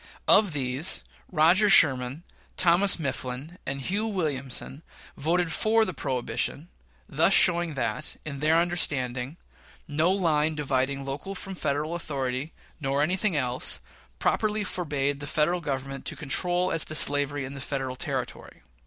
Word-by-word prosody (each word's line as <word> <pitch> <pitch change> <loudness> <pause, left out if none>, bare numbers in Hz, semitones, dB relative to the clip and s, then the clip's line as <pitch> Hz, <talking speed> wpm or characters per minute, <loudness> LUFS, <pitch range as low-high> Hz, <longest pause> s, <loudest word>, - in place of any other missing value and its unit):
Of 205 -6 +6
these, 135 +3 0 0.3
Roger 180 +5 +5
Sherman, 135 -4 +4 0.3
Thomas 180 +3 +5
Mifflin, 140 +2 -5
and 140 +1 -2
Hugh 205 - 0
Williamson 145 - -2 0.3
voted 170 +3 0
for 220 +1 +3
the 185 - -4
prohibition, 140 +4 -3 0.4
thus 165 +6 +3
showing 170 -3 +4
that, 110 -5 -2
in 140 -3 -6
their 155 +3 +3
understanding, 140 -5 -1 0.5
no 155 +3 +1
line 160 -5 +1
dividing 140 -1 -1
local 145 +9 -5
from 195 +1 -7
Federal 150 -2 -2
authority, 135 -3 -3 0.3
nor 140 0 0
anything 185 +3 +1
else, 125 -2 0 0.4
properly 215 - 0
forbade 145 -7 -2
the 145 - -6
Federal 165 +4 +1
Government 135 -2 -4
to - - -2
control 175 +5 0
as 165 - +1
to 155 - -6
slavery 145 -1 +2
in 135 +1 -7
Federal 135 -1 -3
territory. - - -5
150 Hz, 135 wpm, -26 LUFS, 135-175 Hz, 0.5 s, Of